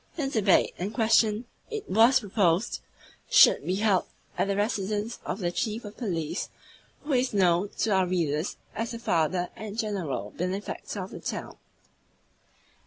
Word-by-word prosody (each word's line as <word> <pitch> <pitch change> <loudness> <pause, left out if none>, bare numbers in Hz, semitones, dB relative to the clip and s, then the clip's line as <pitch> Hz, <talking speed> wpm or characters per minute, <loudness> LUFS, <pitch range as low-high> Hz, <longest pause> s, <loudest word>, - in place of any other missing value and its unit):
The 295 -5 -1
debate 215 -8 +3
in 185 +3 -2
question, 220 0 +2 0.2
it 435 -3 -5
was 230 +6 +5
proposed, 195 -1 +1 0.5
should - - +7
be 185 - -1
held 205 -2 +2 0.3
at - - 0
the 200 - 0
residence 210 +2 -1
of - - -2
the 175 -4 -1
Chief 220 +4 -2
of 205 - -9
Police, 170 - -3 0.5
who 295 0 -2
is 250 -3 +1
known 185 0 +3
to 225 - +1
our 190 -2 +3
readers 165 -2 -1 0.2
as 225 +1 -3
the - - -4
father 175 -4 0
and 210 0 -7
the - - -5
general 170 - -2
benefactor 190 +2 -4
of 190 - -9
the - - -7
town. - - -5
205 Hz, 160 wpm, -27 LUFS, 180-225 Hz, 0.5 s, should